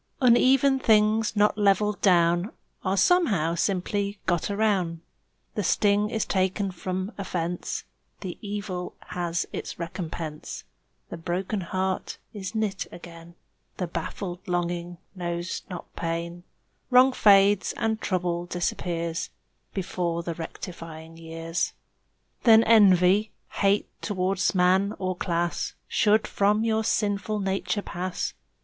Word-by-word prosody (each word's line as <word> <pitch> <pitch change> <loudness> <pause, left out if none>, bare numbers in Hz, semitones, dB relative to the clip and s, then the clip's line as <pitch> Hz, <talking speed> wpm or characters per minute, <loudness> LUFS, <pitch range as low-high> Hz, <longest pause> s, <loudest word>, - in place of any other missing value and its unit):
Uneven 265 +2 +5
things 215 -1 +3
not 210 +1 +3
leveled 205 0 +2
down 175 +1 +3 0.3
Are 190 +1 0
somehow 200 - +3
simply 200 +3 -1
got 175 0 0
aroun'; 200 -6 0 0.5
The 210 - -1
sting 205 +3 +2
is 220 -1 -1
taken 190 +1 0
from 185 +2 -4
offence; 175 -2 -3 0.4
The 185 -3 -6
evil 200 -3 -5
has 175 -1 -1
its - - -5
recompense; 165 -3 -6 0.5
The - - -6
broken 185 +4 -2
heart 185 +2 -2 0.2
is 200 0 -6
knit 210 -3 -1
again; 170 0 -12 0.4
The 180 - -1
baffled 175 +2 -5
longing 175 0 -2 0.2
knows 175 -1 -3
not 180 -2 -8
pain; 170 +1 -4 0.4
Wrong 255 +1 +6
fades 200 -3 +5
and 220 -1 -1
trouble 175 -2 -1
disappears 175 0 -2 0.5
Before 175 -3 -2
the 170 - -3
rectifying 165 -1 -8
years. 165 +1 -3 0.7
Then 225 -2 +7
envy, 200 -2 +5 0.2
hate 200 +1 +1
towards 190 -1 0
man 185 +3 +3
or 185 -1 -2
class 170 -1 -2
Should 215 +1 +3
from 205 +2 +2
your 220 -1 +1
sinful 210 -1 0
nature 195 +1 -1
pass. 180 +1 -3
185 Hz, 115 wpm, -26 LUFS, 175-210 Hz, 0.7 s, Then